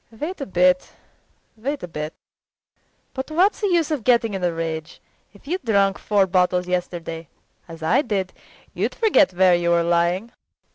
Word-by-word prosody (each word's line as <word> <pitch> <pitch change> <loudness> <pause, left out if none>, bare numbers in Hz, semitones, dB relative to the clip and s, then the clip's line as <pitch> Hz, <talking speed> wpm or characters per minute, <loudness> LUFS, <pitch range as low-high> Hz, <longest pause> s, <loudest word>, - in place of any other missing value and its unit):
Wait 300 +10 -6
a - - -4
bit, 180 -1 +2 0.6
wait 275 +6 -4
a - - -4
bit! 150 -1 -6 1.0
But 265 +2 -5
what's 365 +8 +2
the 415 - +1
use 340 -4 +1
of 290 -7 -2
getting 235 -3 +3
in 190 -2 -4
a 175 - +2
rage. 165 -1 -5 0.3
If 205 - -20
you'd 360 +2 -3
drunk 200 -4 +2
four 205 -2 +2
bottles 180 -1 +1
yesterday 170 -3 -4 0.4
as 165 -1 -10
I 160 - +3
did 200 -8 -2 0.4
you'd - - -2
forget 415 - +4
where 185 0 +4
you 175 0 +1
were 170 0 +3
lying. 175 +6 +1
190 Hz, 165 wpm, -22 LUFS, 175-255 Hz, 1.0 s, forget